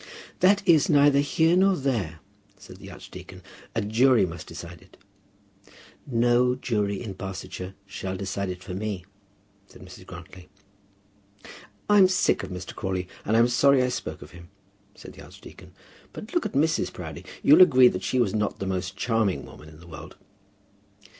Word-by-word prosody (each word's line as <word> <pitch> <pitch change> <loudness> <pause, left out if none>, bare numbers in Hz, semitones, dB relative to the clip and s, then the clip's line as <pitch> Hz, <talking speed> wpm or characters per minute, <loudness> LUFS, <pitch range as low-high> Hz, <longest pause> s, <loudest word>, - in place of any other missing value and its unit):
"That 200 +2 +3
is 160 -5 +4
neither 145 -1 +5
here 160 +4 +2
nor 190 +1 +4
there," 110 - -2 0.4
said - - -14
the - - -12
archdeacon. - - -12 0.3
"A - - +1
jury 115 +2 +3
must 85 -2 -8
decide 85 0 -10
it." - - -21 1.1
"No 120 0 +2
jury 105 -6 -2
in 110 -5 -6
Barsetshire 95 0 -7
shall 95 -1 -6
decide 100 0 -4
it 90 0 -7
for 95 - -7
me," 95 -2 -4 0.6
said - - -15
Mrs. 90 0 -13
Grantly. 90 0 -12 1.4
"I'm 205 -2 +6
sick 185 - +1
of 95 - -7
Mr. 90 0 -7
Crawley, 95 -2 -3 0.2
and 110 +2 +2
I'm 115 +1 +5
sorry 130 +2 +4
I 125 - 0
spoke 125 - -5
of 75 - -15
him," 85 -1 -14 0.5
said - - -12
the - - -14
archdeacon. - - -14 0.4
"But 215 - -10
look 345 - +1
at - - -13
Mrs. 155 +4 +1
Proudie. - - -8 0.2
You'll 150 +6 +7
agree 130 -8 +7
that - - -5
she 130 - -2
was 120 -6 +1
not 105 -1 -1
the 100 - -5
most 95 0 -3
charming 110 -3 0
woman 75 - -14
in 75 -1 -16
the 85 - -15
world." 80 -4 -11
105 Hz, 165 wpm, -25 LUFS, 90-135 Hz, 1.4 s, You'll